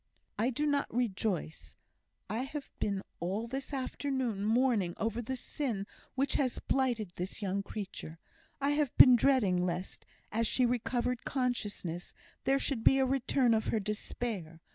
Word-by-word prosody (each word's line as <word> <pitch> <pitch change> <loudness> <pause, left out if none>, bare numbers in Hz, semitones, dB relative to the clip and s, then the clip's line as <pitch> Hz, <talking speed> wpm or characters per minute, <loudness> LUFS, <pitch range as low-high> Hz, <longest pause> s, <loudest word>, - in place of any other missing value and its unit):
"I 230 +4 +3
do 265 +4 -1
not 285 -1 +1
rejoice. 205 -8 -2 0.5
I 220 - -2
have 275 +2 -5
been 200 -2 -1 0.2
all 195 +6 -1
this 265 +4 -5
afternoon 260 -5 -2
mourning 220 -5 +2
over 225 +2 -1
the 260 +3 -3
sin 245 -6 -3 0.3
which 270 +1 +1
has 255 -3 0
blighted 240 -8 0
this 185 +4 -4
young 195 0 0
creature; 195 -6 -6 0.4
I 280 +1 +2
have 290 -3 0
been 255 -2 +10
dreading 225 -9 +3
lest, 180 +1 -3 0.2
as 230 +1 +1
she 255 - +3
recovered 245 0 0
consciousness, 205 -10 -2 0.3
there 270 +1 +4
should 270 -4 -1
be 270 - +6
a 265 - +4
return 260 -1 +2
of 220 -1 +1
her 220 - +1
despair. 205 -4 -4
235 Hz, 150 wpm, -32 LUFS, 200-265 Hz, 0.5 s, been